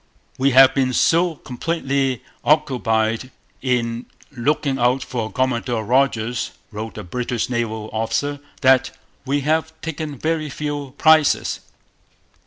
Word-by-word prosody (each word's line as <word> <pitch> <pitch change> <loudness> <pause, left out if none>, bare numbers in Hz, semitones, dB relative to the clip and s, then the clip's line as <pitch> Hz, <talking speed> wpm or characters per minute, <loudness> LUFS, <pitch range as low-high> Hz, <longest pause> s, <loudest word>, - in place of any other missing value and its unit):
'We 135 +1 +4
have 135 0 +9
been 130 -2 +1
so 170 +5 +3
completely 135 -2 -2 0.2
occupied 125 -6 +1 0.3
in 120 -2 -1 0.2
looking 140 +1 0
out 125 +2 +2
for 115 -4 -4
Commodore 120 -3 -1
Rodgers,' 120 -1 +1 0.2
wrote 110 -1 -6
a - - -5
British 120 +5 -3
naval 110 -3 -2
officer, 140 +6 -1 0.2
'that 130 0 +3 0.3
we 140 +1 +1
have 160 +2 -1
taken 155 -2 -5
very 155 +1 -1
few 145 -1 -5
prizes.' 155 -2 +4
130 Hz, 115 wpm, -21 LUFS, 120-145 Hz, 0.3 s, have